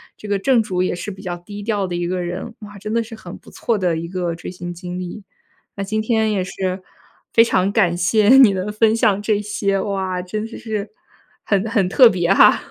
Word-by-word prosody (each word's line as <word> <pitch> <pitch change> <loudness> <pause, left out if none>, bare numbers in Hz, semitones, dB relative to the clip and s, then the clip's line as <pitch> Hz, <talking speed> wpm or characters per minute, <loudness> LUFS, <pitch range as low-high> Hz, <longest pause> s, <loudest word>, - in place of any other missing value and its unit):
这 215 - -10
个 205 -1 +1
正 240 +3 +3
主 185 -4 -1
也 - - -1
是 180 +4 -5
比 190 -1 -9
较 175 -1 -3
低 205 +4 -9
调 205 -3 -1
的 175 - -4
一 175 0 -2
个 180 0 -2
人。 180 +6 -5
哇， 205 -1 -11
真 215 +2 -5
的 230 - +2
是 225 0 -8
很 180 -5 -10
不 - - -17
错 230 - -1
的 180 -4 0
一 170 - -5
个 175 -2 -3
追 165 - -8
星 175 -1 -7
经 180 +1 -7
历。 185 +3 -7 0.5
那 200 - -3
今 215 +2 -1
天 220 -1 +1
也 200 -3 0
是 190 0 -3 0.5
非 230 - +7
常 190 -4 +1
感 175 -6 +2
谢 205 +5 +3
你 240 -7 +7
能 190 +2 -3
分 220 +1 +3
享 210 -3 +2
这 210 -1 0
些， 200 -1 -1
哇， 190 -2 -2
真 210 +4 -4
的 230 - -10
是 215 -3 -4 0.5
很 200 +1 0
很 200 -5 +1
特 245 +4 +7
别 180 -1 +1
哈。 - - +6
195 Hz, 245 characters per minute, -20 LUFS, 180-215 Hz, 0.5 s, 非